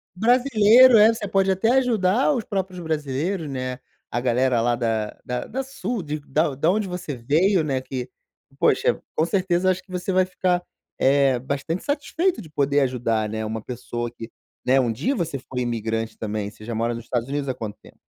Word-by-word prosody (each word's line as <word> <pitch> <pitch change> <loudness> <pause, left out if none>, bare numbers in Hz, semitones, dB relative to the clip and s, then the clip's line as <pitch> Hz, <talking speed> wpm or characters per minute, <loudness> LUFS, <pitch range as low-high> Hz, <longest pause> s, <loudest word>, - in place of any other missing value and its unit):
Brasileiro 245 +2 +6
é, 220 +2 +7
você 210 -2 -5
pode 195 0 +2
até 190 +5 +2
ajudar 235 +1 +2
os 245 -5 -2
próprios 190 -3 -3
brasileiros, 155 +1 -2
né, 130 -1 -4 0.3
a 120 - -1
galera 125 0 +2
lá 120 +1 +2
da 115 -3 -2
da 215 - -3
sul 250 -6 -4 0.2
da 150 0 +1
de 145 +5 -1
onde 200 +2 +2
você 180 -5 -5
veio, 160 - +2
né, 135 -3 -1
que, 130 -1 -6 0.5
poxa, - - +2
com 160 - +2
certeza, 180 0 +1
eu - - +6
acho 185 0 -3
que - - -37
você 180 +1 -2
vai 185 0 +3
ficar, 180 -1 0 0.4
eh, 135 -1 +3
bastante 140 +7 -3
satisfeito 300 0 -1
de 160 - -12
poder 145 -1 +1
ajudar, 115 -4 0
né. 110 0 -3
Uma 110 +1 -4
pessoa 120 0 -5
que, 115 -1 -9 0.4
né, 130 +2 +4
um 120 -2 0
dia 255 - -1
você 165 - -2
foi 125 0 -5
imigrante 115 -2 -2
também. 105 -1 -3
Você 105 - -14
já 115 0 -4
mora 115 +2 0
nos 115 0 -7
Estados 120 0 -2
Unidos 140 0 -2
há 130 - 0
quanto 110 -4 -7
tempo? - - -18
145 Hz, 190 wpm, -23 LUFS, 120-190 Hz, 0.5 s, é